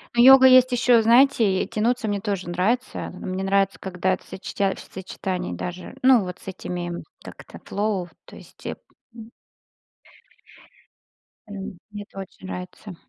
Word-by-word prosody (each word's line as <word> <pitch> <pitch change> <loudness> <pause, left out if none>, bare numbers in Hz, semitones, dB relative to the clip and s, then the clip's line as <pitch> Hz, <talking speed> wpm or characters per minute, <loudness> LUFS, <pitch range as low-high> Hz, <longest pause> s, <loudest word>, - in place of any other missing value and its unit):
Ну 240 - +5
йога 265 0 +9
есть 255 0 +6
ещё, 245 -1 +4
знаете, 230 -6 +4
тянуться 230 +1 -1
мне 205 -1 -1
тоже 195 -4 -3
нравится. 220 +9 -1
Мне 185 +1 -5
нравится, 195 0 +1
когда 185 0 -1
это - - -5
в - - -21
сочетя 195 0 -2
в - - -12
сочетании 185 -1 -5
даже, 180 0 -7
ну, 255 -5 +5
вот 180 -1 -7
с - - -17
этими, 175 -2 -5 0.3
как - - -11
это - - -12
flow, 200 -3 -2 0.2
то - - -14
есть, - - -16
м. 230 -2 -11 2.2
М, 200 -2 -7
мне 205 0 -7
это 195 - -14
очень 190 0 -11
нравится. 180 +1 -8
200 Hz, 150 wpm, -23 LUFS, 185-230 Hz, 2.2 s, йога